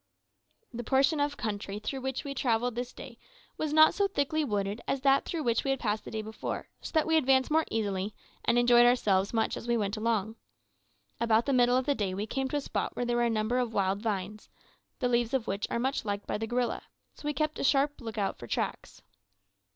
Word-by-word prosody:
The 240 +1 -4
portion 275 +5 +2
of 285 0 0
country 205 -2 -4
through 260 +6 -4
which 265 0 -3
we 280 - -4
travelled 245 -2 0
this 245 +2 -4
day 235 -3 -11 0.4
was 310 -1 -2
not 310 +1 +7
so 400 0 +2
thickly 310 -3 0
wooded 205 -3 -2
as 275 - -1
that 275 0 +4
through 330 -3 -3
which 235 -3 +1
we 275 - -2
had 270 -1 +1
passed 215 -2 -1
the - - -6
day 220 0 -4
before, 220 +1 -5
so - - -6
that 315 - +4
we 320 0 +3
advanced 265 -1 +3
more 320 +1 +3
easily, 205 -2 -2 0.3
and 235 - +2
enjoyed 240 0 +6
ourselves 200 -5 +2
much 225 -1 0
as - - -7
we 235 0 +2
went 205 0 -1
along. 220 -1 -1 0.8
About 230 0 +3
the 280 - +1
middle 245 0 +4
of 260 - 0
the 285 - +2
day 200 -7 -2
we 205 +2 -2
came 265 +4 -2
to 280 - -4
a - - -1
spot - - -3
where 245 - -1
there 240 0 0
were - - +2
a - - +2
number 225 +2 0
of 240 -3 -1
wild 195 0 +1
vines, 210 -1 -3 0.5
the 250 - 0
leaves 240 +1 +1
of 250 -4 0
which 200 +1 -2
are - - -1
much 265 +3 -1
liked 205 -2 -3
by - - -2
the 225 - -3
gorilla, 240 0 -1 0.3
so - - -14
we 295 - +1
kept 305 +2 -1
a - - -2
sharp 285 +1 +2
lookout 220 -4 -3
for 120 - -8
tracks. - - -4
240 Hz, 230 wpm, -29 LUFS, 215-270 Hz, 0.8 s, not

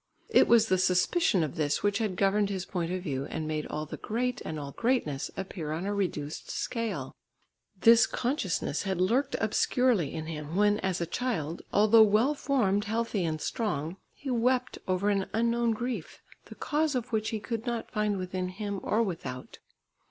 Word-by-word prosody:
It - - +5
was 230 -2 +6
the 185 -2 +2
suspicion 185 - +3
of 150 - -4
this 145 -2 0
which 205 -1 +2
had 215 -5 -1
governed 200 +2 +2
his 190 -2 -3
point 175 -3 -3
of 185 0 -3
view 140 -5 -2
and 155 +1 -4
made 155 -1 -2
all 155 +1 -4
the - - -7
great 245 +3 -2
and 155 -1 -4
all 140 -1 -6
greatness 190 - 0
appear 180 -5 -5
on 165 +4 -3
a 205 - -1
reduced 160 -7 -3
scale. 210 - -3 0.7
This 230 +3 +7
consciousness 240 - -1
had 190 -3 -2
lurked 250 +10 +2
obscurely 220 - +2
in 160 -1 -5
him, 155 0 -6
when, 205 +1 +3
as 185 -2 -1
a - - +1
child, 170 - -2
although 215 +2 +6
well 220 +7 +4
formed, 215 -9 +1
healthy 225 -2 -1
and 160 -2 -1
strong, 170 - -2 0.2
he 275 - -5
wept 250 +1 +1
over 185 +2 +1
an 195 -1 0
unknown 235 +1 +2
grief, 230 -4 -3 0.3
the - - -11
cause 305 -1 0
of 250 0 -3
which 220 -1 0
he 220 - -2
could 230 +2 -4
not 235 -1 -3
find 210 -1 0
within 185 0 -3
him 200 +1 -4
or 225 +2 +1
without. 160 - -6
200 Hz, 180 wpm, -29 LUFS, 170-230 Hz, 0.7 s, This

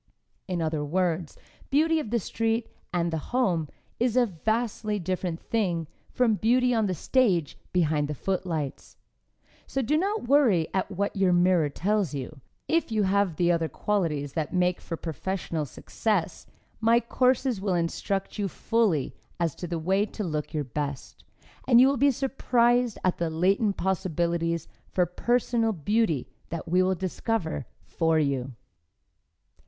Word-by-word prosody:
In 175 -3 -1
other 155 -2 -1
words, 170 0 -1 0.3
beauty 320 +3 +3
of 265 - -4
the 235 - +1
street 225 +2 -1 0.2
and 170 -1 0
the 160 - 0 0.2
home 170 - +1 0.3
is 245 0 +1
a 250 - +5
vastly 215 +2 -1
different 180 -2 -2
thing 180 -8 -1 0.2
from 250 -3 +2
beauty 250 +2 +3
on 220 -3 +2
the 185 - -1
stage 180 - +1 0.2
behind 155 -4 +1
the 150 - -4
footlights. 165 -4 -3 0.7
So 270 - -1
do 300 +7 +2
not 395 - -1
worry 235 - +4
at 190 0 0
what 200 +1 -2
your 190 -2 +3
mirror 175 -3 +3
tells 195 +1 0
you. 135 +1 -6 0.3
If 330 -6 +1
you 215 -2 +2
have 195 -3 +2
the 175 +2 +2
other 165 -2 0
qualities 150 -6 -1
that 160 +1 -2
make 180 0 +1
for 165 - -5
professional 165 0 -3
success, 185 - -2 0.3
my 230 +1 +4
courses 250 -1 +1
will 195 -2 0
instruct 195 +5 -2
you 200 - +1
fully 195 - 0 0.3
as 170 -4 +1
to 175 - -6
the 170 0 -2
way 190 +6 +1
to 215 - -5
look 150 -4 -3
your 150 -2 -1
best, 140 +1 -5 0.4
and 240 -2 +7
you 255 - +8
will 275 0 +2
be 280 +3 +5
surprised 245 -3 +2
at 185 - +1
the 170 -1 0
latent 195 +5 +1
possibilities 170 -3 -1 0.2
for 180 - +2
personal 230 +4 +1
beauty 195 - 0 0.2
that 170 +1 -5
we 180 +3 +3
will 185 0 +2
discover 180 - -2 0.2
for 165 -1 +1
you. 135 -4 0
185 Hz, 155 wpm, -27 LUFS, 165-225 Hz, 0.7 s, you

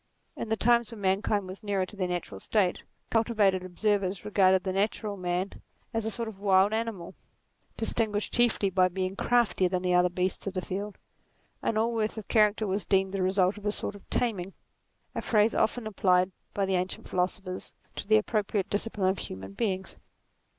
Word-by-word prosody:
In 225 - -5
the 220 - +1
times 235 0 +3
when 230 - -9
man 190 0 +2
kind 205 -3 0
were 185 - -5
nearer 200 -3 0
to 210 - -11
their 185 -2 -1
natural 175 - -4
state, 190 - +1 0.3
cultivated 215 -5 +2
observers 195 +1 -1
regarded 190 -3 +4
the 190 - -2
natural 205 +1 -1
man 180 +1 -3 0.3
as 225 -1 -1
a - - +1
sort 230 +1 -3
of 210 -3 -8
wild 195 +1 +4
animal, 220 -6 -3 0.6
distinguished 220 -2 0
chiefly 235 -5 +3
by 185 0 +4
being 185 +1 -3
craftier 235 -6 +2
than 180 0 -1
the 180 0 +1
other 180 0 +4
beasts 180 +2 -2
of 195 - -3
the 185 - 0
field; 200 +2 -4 0.6
and 225 - 0
all 230 +2 +1
worth 220 -1 -1
of 215 - -7
charac 210 -2 +4
ter 220 - -2
was 195 0 -1
deemed 190 0 +1
the 195 - -1
result 190 +1 +2
of 205 - -14
a - - +2
sort 205 - -1
of 205 - -15
taming; 195 -6 -1 0.6
a - - -3
phrase 215 0 +3
often 230 +1 +1
applied 185 -3 +2 0.2
by 200 - +1
the 190 - -1
ancient 185 0 -2
philosophers 185 +1 -2 0.2
to - - -5
the 215 +1 +6
appropriate 210 -2 -1
discipline 205 -2 0
of 190 - -1
human 95 +1 -7
beings. 190 - -2
195 Hz, 190 wpm, -28 LUFS, 185-215 Hz, 0.6 s, the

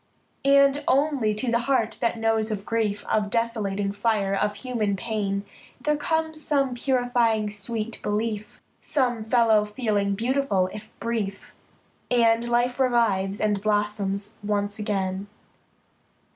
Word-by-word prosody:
And 280 +1 +5
only 270 -6 +2
to 235 +3 -1
the 235 - +3
heart 230 -5 +1
that 235 0 +1
knows 225 -1 +1
of 210 -2 -4
grief, 215 -3 -1
Of 210 -1 0
desolating 205 -4 -1
fire, 205 -1 0
of 205 +1 0
human 215 -3 -1
pain, 200 -2 -2 0.3
There 300 +3 +1
comes 315 +1 -1
some 275 -4 +1
purifying 240 -4 +1
sweet 215 +2 -4
belief, 210 0 -3 0.2
Some 250 -6 0
fellow 220 -2 +4
feeling 210 -2 -1
beautiful, 225 -5 +1
if 215 +1 -9
brief. 215 -4 -3 0.6
And 235 -1 +3
life 240 +2 +1
revives, 215 -6 +2
and 210 -2 +1
blossoms 205 -1 -1
once 205 0 -1
again. 195 -2 -2
220 Hz, 125 wpm, -25 LUFS, 205-245 Hz, 0.6 s, And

